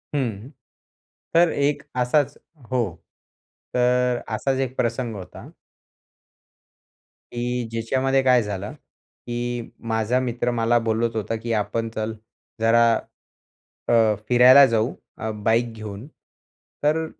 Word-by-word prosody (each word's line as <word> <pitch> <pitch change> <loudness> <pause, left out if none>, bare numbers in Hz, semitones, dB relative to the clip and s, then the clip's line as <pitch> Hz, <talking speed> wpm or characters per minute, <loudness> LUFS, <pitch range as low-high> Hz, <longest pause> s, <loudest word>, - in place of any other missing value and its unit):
हं. 120 -3 -2 0.9
तर 170 0 +6
एक 145 0 0 0.2
असाच 140 +3 +1 0.3
हो, 125 -1 +2 0.9
तर 125 0 +2 0.2
असाच 135 +4 -1
एक 130 -1 -2
प्रसंग 115 -1 -1
होता. 95 +5 -10 1.8
की 120 0 -2
ज्याच्यामध्ये 130 +4 +1
काय 125 -3 +4
झालं, 100 0 -5
की 120 0 -7 0.2
माझा 110 +3 +1
मित्र 120 -1 -1
मला 120 0 +2
बोलत 115 0 -1
होता, 110 +1 -2
की 115 +1 -3
आपण 110 +2 -1
चल 110 +1 -2 0.5
जरा, 115 +1 +4 1.0
अ, 115 -2 +4
फिरायला 125 +3 +8
जाऊ, 115 0 0 0.2
अ, 110 - -4
बाईक 115 +1 +2
घेऊन. 110 +2 -8 0.8
तर 160 +2 +2
120 Hz, 110 wpm, -23 LUFS, 110-130 Hz, 1.8 s, फिरायला